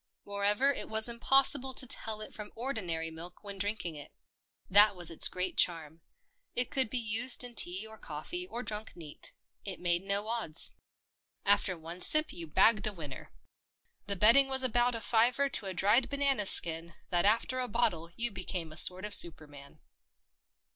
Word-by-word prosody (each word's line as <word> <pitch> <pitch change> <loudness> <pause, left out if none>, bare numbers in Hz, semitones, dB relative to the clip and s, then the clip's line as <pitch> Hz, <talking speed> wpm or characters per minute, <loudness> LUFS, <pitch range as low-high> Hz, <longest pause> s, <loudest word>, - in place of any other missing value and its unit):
Moreover 205 +7 0
it - - -5
was 220 +1 +1
impossible 265 +2 +1
to 260 - -4
tell 220 -3 -1
it 215 - -8
from 210 -1 -11
ordinary 180 -10 -5
milk 170 +4 -13
when 200 -1 -10
drinking 200 -4 -4
it. 145 -1 -13 0.6
That 205 +1 +4
was 175 -2 -6
its 165 - +4
great 185 0 -5
charm. 165 -2 -2 0.5
It 245 0 0
could 265 -5 +1
be 255 - -1
used 230 +3 +3
in 245 -1 -4
tea 190 -1 +3
or 220 0 -15
coffee 350 - -8
or 245 -8 -8
drunk 215 -1 -7
neat. 160 -4 -7 0.3
It 195 -3 -8
made 175 0 -2
no 200 +1 -2
odds. 220 -9 +1 0.7
After 200 -2 0
one 165 +2 -10
sip 310 - +4
you 170 -1 -9
bagged 215 +7 +2
a 210 - -4
winner. 150 -7 -10 0.8
The 200 - -2
betting 230 +8 +4
was 265 0 -1
about 245 0 +1
a 230 - -7
fiver 245 +6 0
to 210 -6 +2
a 190 - -6
dried 210 +8 +1
banana 275 -7 0
skin 165 -1 +3
that 175 0 -1
after 230 +4 0
a 250 - -4
bottle 175 -8 -2
you 235 +1 -1
became 180 -4 -5
a 155 - -7
sort 185 +3 +7
of 210 - +4
superman. 150 -5 +2
205 Hz, 175 wpm, -29 LUFS, 175-240 Hz, 0.8 s, sort